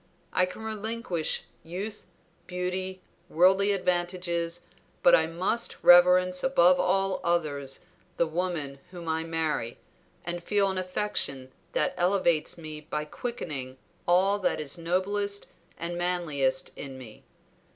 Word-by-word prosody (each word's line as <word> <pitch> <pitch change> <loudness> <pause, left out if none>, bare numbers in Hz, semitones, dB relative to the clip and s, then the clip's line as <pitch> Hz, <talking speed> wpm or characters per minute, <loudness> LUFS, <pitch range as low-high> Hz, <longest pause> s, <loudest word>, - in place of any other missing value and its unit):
I 185 - +3
can 185 +4 -9
relinquish 220 -5 -2 0.2
youth, 195 +6 -6 0.4
beauty, 185 +1 -3 0.3
worldly 190 +4 +4
advantages, 175 -2 -1 0.4
but - - +7
I - - +6
must 185 +8 -1
reverence 180 +1 +6
above 185 -9 +5
all 195 +1 +1
others 145 -6 -1 0.4
the 170 - +3
woman 160 -4 -3
whom 175 -2 -9
I 160 0 0
marry, 160 -7 -2 0.5
and 175 0 -4
feel 200 0 +2
an 190 - -2
affection 180 -9 -1 0.2
that - - +1
elevates 175 -4 +2
me 155 -2 -7
by 150 0 -2
quickening 150 - -5 0.3
all 190 +4 +4
that 190 - 0
is 145 -2 -1
noblest 200 +4 -1 0.3
and 175 +1 -4
manliest 150 -7 0
in 135 -2 -7
me. 120 -5 -12
175 Hz, 120 wpm, -28 LUFS, 160-190 Hz, 0.5 s, but